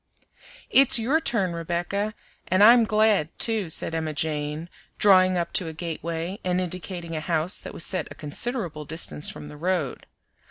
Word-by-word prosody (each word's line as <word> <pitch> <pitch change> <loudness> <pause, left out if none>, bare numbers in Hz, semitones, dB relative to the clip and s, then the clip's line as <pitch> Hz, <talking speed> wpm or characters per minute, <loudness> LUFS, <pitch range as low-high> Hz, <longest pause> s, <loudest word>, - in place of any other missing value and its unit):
"It's 270 -2 +6
your 255 +8 +2
turn, 195 - 0
Rebecca, 175 +5 -2 0.3
and 185 +2 +3
I'm 235 +1 +8
glad, 210 -6 +2
too," 220 -6 +1
said 160 - -2
Emma 160 -1 -2
Jane, 150 +1 -2 0.3
drawing 185 -2 +5
up 170 -1 -2
to 180 - -1
a 160 - -6
gateway 170 +2 -5
and 180 0 0
indicating 180 -1 -5
a 155 - -3
house 165 +3 -1
that - - -9
was 165 - +3
set 185 -5 0
a 145 - -10
considerable 155 - -3
distance 155 0 -1
from 150 - -8
the 150 0 -11
road. 170 -4 -2
175 Hz, 165 wpm, -25 LUFS, 160-200 Hz, 0.3 s, I'm